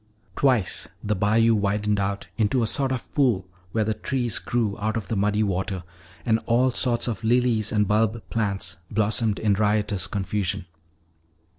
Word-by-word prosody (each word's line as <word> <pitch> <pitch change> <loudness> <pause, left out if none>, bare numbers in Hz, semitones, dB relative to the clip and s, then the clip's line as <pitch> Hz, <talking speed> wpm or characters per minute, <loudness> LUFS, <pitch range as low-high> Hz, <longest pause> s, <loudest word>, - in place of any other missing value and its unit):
Twice 125 -9 +1 0.2
the 105 0 0
bayou 110 +4 +3
widened 105 0 +1
out 100 0 -2
into 115 +3 +1
a - - +2
sort 135 +4 0
of 130 -2 -5
pool 120 -10 +2 0.2
where 110 +3 +1
the 110 +1 0
trees 120 -1 -1
grew 115 -4 -1
out 110 +2 -1
of 100 -6 -5
the 115 - -1
muddy 105 +2 +1
water 95 -1 -2 0.4
and 110 0 +3
all 125 +2 +3
sorts 120 -1 +1
of 115 -2 -3
lilies 115 -2 +2
and 105 -2 +2
bulb 110 +2 +1
plants 100 -6 -1
blossomed 110 0 +1
in 105 -2 +2
riotous 105 -2 +1
confusion. 95 -2 -2
105 Hz, 160 wpm, -24 LUFS, 100-115 Hz, 0.4 s, bayou